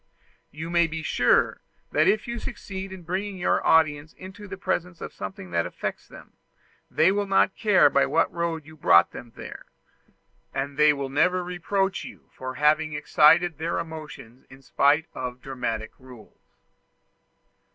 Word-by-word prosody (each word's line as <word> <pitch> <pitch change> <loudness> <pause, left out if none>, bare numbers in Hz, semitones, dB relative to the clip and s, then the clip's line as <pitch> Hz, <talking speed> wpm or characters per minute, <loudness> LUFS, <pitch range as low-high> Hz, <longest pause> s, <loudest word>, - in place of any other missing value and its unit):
You 160 +3 -7
may 170 -1 +3
be 160 0 -6
sure 125 -5 +2 0.3
that 155 +3 +3
if 210 +4 +2
you 235 0 -4
succeed 190 -3 -7
in 190 -2 -9
bringing 190 +3 -3
your 175 - +1
audience 155 -1 +2
into 190 +2 -11
the 195 0 -7
presence 180 -2 -3
of - - -8
something 95 -2 -8
that 85 -1 0
affects - - -6
them, - - -15 0.6
they 170 +4 +3
will 205 0 -1
not 195 0 +2
care 210 -4 +4
by - - +2
what 165 - +1
road 170 -3 -3
you 160 0 -14
brought 85 - +5
them 120 - -10
there; - - -10 0.9
and 140 +1 -3
they 150 +1 +5
will 140 -2 -3
never 180 +6 +2
reproach 190 +2 -2
you - - -13
for 130 0 -7
having 155 +1 +2
excited 150 +2 +4
their 165 +2 -2
emotions 155 -7 -8
in 135 +1 -16
spite 145 +4 +2
of 125 -1 -6
dramatic 120 -5 -4
rules. 125 -4 -16
160 Hz, 160 wpm, -25 LUFS, 140-180 Hz, 0.9 s, brought